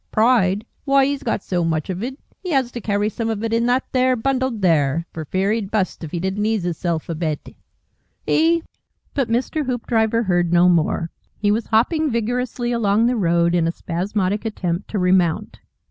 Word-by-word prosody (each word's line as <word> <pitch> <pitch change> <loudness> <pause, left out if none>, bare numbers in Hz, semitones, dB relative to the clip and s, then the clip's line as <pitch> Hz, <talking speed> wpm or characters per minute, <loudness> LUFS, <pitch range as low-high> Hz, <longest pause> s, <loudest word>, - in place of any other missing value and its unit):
Pride! 215 -3 +3 0.2
Why, 275 -1 +4
'e's 280 0 -1
got 200 - -2
so 175 -2 -1
much 160 -2 -1
of 185 +1 -4
it, 260 +3 -4 0.3
'e 365 - -4
has 265 -6 +1
to 240 - -6
carry 205 0 0
some 225 +1 -3
of 220 -1 -3
it 225 0 -1
in 230 +1 +2
that 250 +2 +2
there 255 0 +3
bundle 260 +2 0
there, 165 - +1
for 160 -1 -5
fear 190 +6 0
'e'd 215 -3 -1
bust 200 -5 -1
if 155 - -6
'e 175 - -2
didn't 190 +3 -2
ease 215 -3 0
hisself 170 -2 -2
a 170 - -2
bit 155 -2 -4 0.7
'E 330 +1 +3 0.2
" - - -45
But 270 -5 0
Mr. 255 +5 -1
Hoopdriver 230 -2 +1
heard 175 -4 +1
no 175 +1 +5
more. 165 -1 +1 0.3
He 205 -1 +1
was 220 +2 -1
hopping 300 +8 +2
vigorously 240 +1 -1
along 220 -1 +2
the 245 +1 +2
road, 170 -4 +2
in 170 -2 +2
a - - +1
spasmodic 190 +4 -2
attempt 185 -5 -3
to 215 - -3
remount. 180 -3 +1
210 Hz, 195 wpm, -21 LUFS, 175-240 Hz, 0.7 s, no